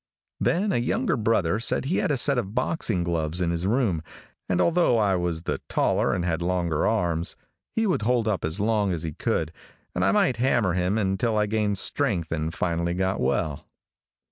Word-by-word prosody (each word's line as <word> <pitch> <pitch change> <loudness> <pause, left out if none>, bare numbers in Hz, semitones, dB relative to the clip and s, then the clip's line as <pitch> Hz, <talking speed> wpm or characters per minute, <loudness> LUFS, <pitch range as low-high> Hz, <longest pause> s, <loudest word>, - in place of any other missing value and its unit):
Then 200 +4 +1
a - - +1
younger 180 - 0
brother 105 -5 +1
said 120 - +1
he 165 +7 0
had - - 0
a 145 - +1
set 140 +1 +3
of 105 -3 -5
boxing 125 - 0
gloves 85 -1 -1
in 85 -2 0
his 85 +2 -1
room, 105 - +1 0.5
and 90 -1 +1
although 170 - +3
I 100 -3 +2
was 85 -2 -2
the - - -3
taller - - +1
and 85 - -1
had 85 -1 -1
longer 85 -3 0
arms, 85 -6 0 0.4
he 225 - +1
would 185 - +1
hold 115 0 +1
up 100 -5 -1
as 80 +5 -1
long 105 -2 +1
its 85 -2 -3
he 80 - -3
could., 80 +1 -1 0.4
and 90 - -1
I 95 - +4
might 115 +5 +2
hammer 120 -6 +2
him 90 +4 0
until 110 +3 0
I 105 - +3
gained 105 -1 0
strength 85 -2 0
and 80 0 -1
finally 85 +1 -1
got 95 +1 0
well. 75 -3 -1
95 Hz, 195 wpm, -25 LUFS, 85-115 Hz, 0.5 s, I